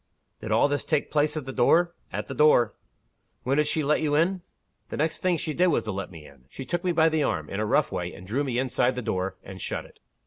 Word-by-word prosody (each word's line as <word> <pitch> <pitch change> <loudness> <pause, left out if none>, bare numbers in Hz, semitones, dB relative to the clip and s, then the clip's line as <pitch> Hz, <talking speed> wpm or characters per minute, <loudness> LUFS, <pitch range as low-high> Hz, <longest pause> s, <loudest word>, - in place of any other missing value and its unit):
'" - - -48
"Did 110 - -5
all 110 +6 +4
this 145 -1 -1
take 155 -3 -1
place 150 +1 +1
at 150 - -4
the 135 - -6
door?" 170 +8 +3 0.2
"At - - -3
the 135 - -6
door." 135 -5 +4 0.7
"When 135 +3 +1
did 150 0 +3
she 155 0 0
let 150 +2 +2
you 150 -2 +1
in?" 180 +4 +2 0.5
"The - - -5
next 155 +2 0
thing 180 -2 +1
she 155 -1 -3
did 180 +4 +3
was 170 - +2
to 110 - -3
let 95 -1 -4
me 80 -4 -12
in. 60 - -17
She 130 - -8
took 175 +4 -2
me 180 - +1
by 165 -1 +4
the 160 -1 +1
arm, 80 - -1
in 100 - -3
a 110 - 0
rough 140 +5 +2
way, 90 0 -3
and 95 - -12
drew 125 +9 -1
me 130 -4 -2
inside 130 0 +1
the 125 - -4
door, 95 -1 -2
and - - -9
shut - - -4
it. - - -19
145 Hz, 275 wpm, -26 LUFS, 110-155 Hz, 0.7 s, all